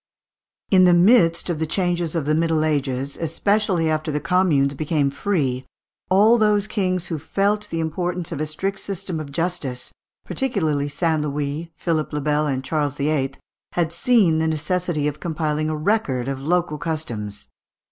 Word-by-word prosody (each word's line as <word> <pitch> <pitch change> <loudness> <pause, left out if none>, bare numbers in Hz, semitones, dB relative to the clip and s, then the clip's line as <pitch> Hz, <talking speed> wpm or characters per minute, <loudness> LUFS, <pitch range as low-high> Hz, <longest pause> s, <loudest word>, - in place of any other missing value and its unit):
In 185 -2 +6
the 175 -1 +6
midst 175 -2 +4
of 170 -4 -1
the 160 - -1
changes 175 -2 -1
of 160 -4 -1
the 155 - +1
Middle 160 -1 +2
Ages, 140 -2 -1
especially 180 +1 +1
after 155 0 -1
the 150 - -1
communes 165 -4 +2
became 145 -1 0
free, 140 -7 -1 0.5
all 215 +5 +5
those 210 -1 +3
kings 185 -4 -1
who 160 -3 -3
felt 200 +6 0
the 165 - -3
importance 175 +2 -2
of 155 -3 -3
a 155 - -1
strict 195 +6 -3
system 190 -3 -4
of 145 -2 -7
justice, 150 -6 -3 0.3
particularly 160 - 0
St. 160 +1 0
Louis, 150 +2 -3
Philippe 155 -1 -1
le 150 - -1
Bel, 150 +1 +1
and 130 -2 -1
Charles 145 -1 -1
VIII., 140 -2 0 0.4
had 170 -2 0
seen 190 -7 +3
the 160 - +1
necessity 160 0 -1
of 150 0 -4
compiling 155 -2 -1
a 155 - -2
record 150 - 0
of 135 -1 -3
local 160 0 0
customs. 120 -12 -4
160 Hz, 165 wpm, -22 LUFS, 150-180 Hz, 0.5 s, In